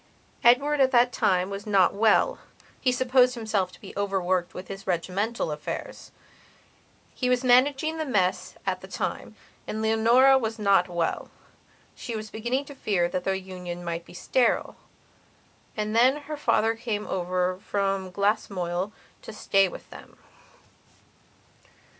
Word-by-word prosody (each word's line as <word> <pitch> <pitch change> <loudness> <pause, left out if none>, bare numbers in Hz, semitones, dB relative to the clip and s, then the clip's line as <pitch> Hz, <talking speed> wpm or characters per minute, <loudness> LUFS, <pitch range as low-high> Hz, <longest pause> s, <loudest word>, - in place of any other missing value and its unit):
Edward 280 +5 +4
at 265 -1 +5
that 245 -1 +3
time 185 0 +1
was 200 +1 -6
not 195 -4 +4
well; 215 +2 +3 0.4
he 255 - +2
supposed 250 0 +3
himself 215 -5 -1
to - - -16
be 195 - -11
overworked 185 -3 -1
with 185 - -7
his 195 0 -9
regimental 190 +4 -1
affairshe 150 - -6 1.1
was 250 0 +1
managing 275 +5 +3
the 315 - -1
mess 195 -8 0
at - - -2
the - - -10
time. - - -4 0.3
And 215 - -4
Leonora 230 +5 +4
was 225 -2 -3
not 200 -4 +3
wellshe 175 +6 -6
was 215 0 -6
beginning 240 +5 -2
to 285 - -10
fear 195 -9 0
that 180 0 -3
their 195 - +1
union 180 -2 -7
might 170 0 -3
be 175 - -15
sterile. 245 +5 0 1.0
And 215 +1 -2
then 260 +5 +4
her 305 +1 -5
father 225 -6 +2
came 225 -2 -4
over 180 0 -1
from 195 -2 -1
Glasmoyle 195 -2 -1 0.3
to - - -9
stay 195 -2 +2
with - - -10
them. - - -13
210 Hz, 140 wpm, -26 LUFS, 185-245 Hz, 1.1 s, at